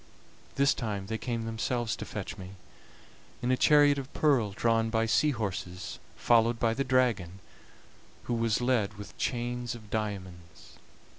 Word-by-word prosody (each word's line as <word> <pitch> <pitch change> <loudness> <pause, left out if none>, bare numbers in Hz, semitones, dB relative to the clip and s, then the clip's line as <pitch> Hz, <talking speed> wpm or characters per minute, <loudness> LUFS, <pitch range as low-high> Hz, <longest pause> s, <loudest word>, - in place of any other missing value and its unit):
This 140 +1 +4
time 105 -5 -3
they 110 +2 -4
came 115 -3 -3
themselves 115 0 -1
to - - -6
fetch 105 -3 -5
me, 95 -2 -9 0.9
in 125 - +1
a - - +4
chariot 145 +1 +5
of 135 0 -8
pearl 135 -9 +3
drawn 115 +2 +1
by 110 0 +1
sea 140 +7 +3
horses, 100 -5 -4 0.2
followed 115 0 +3
by 115 -1 +2
the 135 - -1
dragon, 120 -9 +1 0.9
who 120 - -2
was 115 -1 +1
led 120 -5 +1
with 105 0 -10
chains 120 -1 -2
of 110 -3 -13
diamonds. 95 -5 -6
115 Hz, 150 wpm, -29 LUFS, 105-125 Hz, 0.9 s, chariot